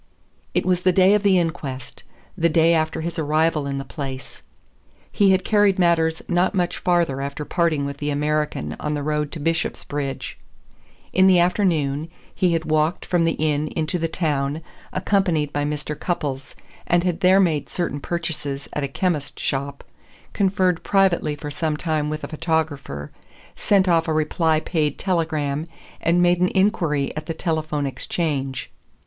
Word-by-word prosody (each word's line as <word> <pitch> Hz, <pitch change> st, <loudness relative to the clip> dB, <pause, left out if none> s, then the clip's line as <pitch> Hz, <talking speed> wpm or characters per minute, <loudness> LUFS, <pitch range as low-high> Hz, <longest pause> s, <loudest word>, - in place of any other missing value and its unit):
It -, -, +1 dB
was 180 Hz, -1 st, +2 dB
the 185 Hz, -, +4 dB
day 190 Hz, +2 st, +5 dB
of 210 Hz, -, +3 dB
the 200 Hz, -2 st, +4 dB
inquest, 150 Hz, -7 st, -3 dB, 0.3 s
the 170 Hz, -2 st, +2 dB
day 165 Hz, +1 st, +4 dB
after 160 Hz, 0 st, 0 dB
his 170 Hz, +1 st, -4 dB
arrival 155 Hz, -1 st, +1 dB
in 140 Hz, 0 st, -2 dB
the 135 Hz, -, -4 dB
place. 135 Hz, -2 st, -7 dB, 0.7 s
He 200 Hz, -1 st, +3 dB
had 190 Hz, -1 st, +3 dB
carried 205 Hz, -2 st, +3 dB
matters 165 Hz, -3 st, +2 dB
not 180 Hz, +3 st, +1 dB
much 175 Hz, -2 st, 0 dB
farther 170 Hz, -7 st, +1 dB
after 140 Hz, +2 st, -4 dB
parting 160 Hz, -5 st, +1 dB
with 140 Hz, 0 st, -5 dB
the 145 Hz, +1 st, -3 dB
American 150 Hz, -, -1 dB
on 150 Hz, 0 st, -2 dB
the 145 Hz, -, -3 dB
road 150 Hz, 0 st, -1 dB
to 165 Hz, -, -5 dB
Bishopsbridge. 145 Hz, -3 st, -3 dB, 0.7 s
In 190 Hz, 0 st, +5 dB
the 185 Hz, -1 st, +6 dB
afternoon 165 Hz, -5 st, +1 dB, 0.2 s
he 180 Hz, -2 st, +2 dB
had 165 Hz, -1 st, -1 dB
walked 155 Hz, +3 st, +1 dB
from 175 Hz, -2 st, +2 dB
the 165 Hz, -, +2 dB
inn 150 Hz, -1 st, 0 dB
into 160 Hz, +2 st, -1 dB
the 165 Hz, -, 0 dB
town, 150 Hz, -2 st, -1 dB, 0.3 s
accompanied 180 Hz, -6 st, +1 dB
by 145 Hz, 0 st, 0 dB
Mr. 150 Hz, 0 st, -3 dB
Cupples, 140 Hz, -5 st, -3 dB, 0.3 s
and 175 Hz, 0 st, +3 dB
had 180 Hz, -2 st, -1 dB
there 190 Hz, 0 st, +5 dB
made 165 Hz, -6 st, +1 dB
certain 170 Hz, -5 st, -2 dB
purchases 150 Hz, -4 st, -4 dB
at 150 Hz, -, -2 dB
a -, -, 0 dB
chemist's 150 Hz, 0 st, -2 dB
shop, 140 Hz, +1 st, -2 dB, 0.5 s
conferred 185 Hz, -3 st, +1 dB
privately 190 Hz, -6 st, +2 dB
for 145 Hz, 0 st, -7 dB
some 155 Hz, 0 st, -1 dB
time 155 Hz, -2 st, -1 dB
with 155 Hz, 0 st, -4 dB
a -, -, -3 dB
photographer, 155 Hz, -, -2 dB, 0.4 s
sent 195 Hz, -2 st, +2 dB
off 165 Hz, -2 st, +3 dB
a 160 Hz, -, +1 dB
reply 155 Hz, +1 st, +1 dB
paid 155 Hz, -3 st, -1 dB
telegram, 160 Hz, -4 st, -1 dB, 0.3 s
and 175 Hz, +2 st, +3 dB
made 175 Hz, 0 st, +3 dB
an 180 Hz, -, +4 dB
inquiry 165 Hz, -8 st, +1 dB
at 155 Hz, 0 st, -6 dB
the 165 Hz, -, -3 dB
telephone 155 Hz, -3 st, -1 dB
exchange. 135 Hz, -1 st, -3 dB
160 Hz, 165 wpm, -22 LUFS, 145-175 Hz, 0.7 s, the